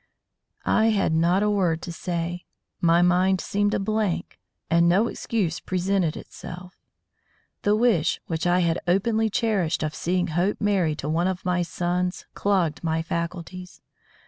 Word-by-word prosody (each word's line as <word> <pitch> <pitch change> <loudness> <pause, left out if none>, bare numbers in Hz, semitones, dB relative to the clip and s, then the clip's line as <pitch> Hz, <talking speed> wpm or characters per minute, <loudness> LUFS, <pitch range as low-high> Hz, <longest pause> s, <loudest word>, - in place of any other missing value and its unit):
I 220 - +3
had 205 -7 +2
not 175 +5 +3
a 210 - +2
word 175 -5 +1
to 175 - -5
say. 175 +1 -4 0.3
My 170 0 +4
mind 180 +1 +3
seemed 205 +2 0
a - - 0
blank, 215 -2 -2 0.3
and 170 +1 +4
no 195 +6 +4
excuse 190 -8 -2
presented 185 -2 0
itself. 180 +1 -10 0.9
The 205 +1 +3
wish 215 -8 +2
which 165 +1 -2
I 180 +1 +3
had 170 -1 +1
openly 220 +5 +2
cherished 200 -8 0
of 155 -1 -2
seeing 180 +2 -1
Hope 175 +6 0
married 190 -7 +1
to 145 - -5
one 165 +4 +1
of 185 -1 -3
my 180 -1 +1
sons 180 +2 -2
clogged 185 -7 0
my 160 0 0
faculties. 170 +2 -5
180 Hz, 150 wpm, -24 LUFS, 170-195 Hz, 0.9 s, My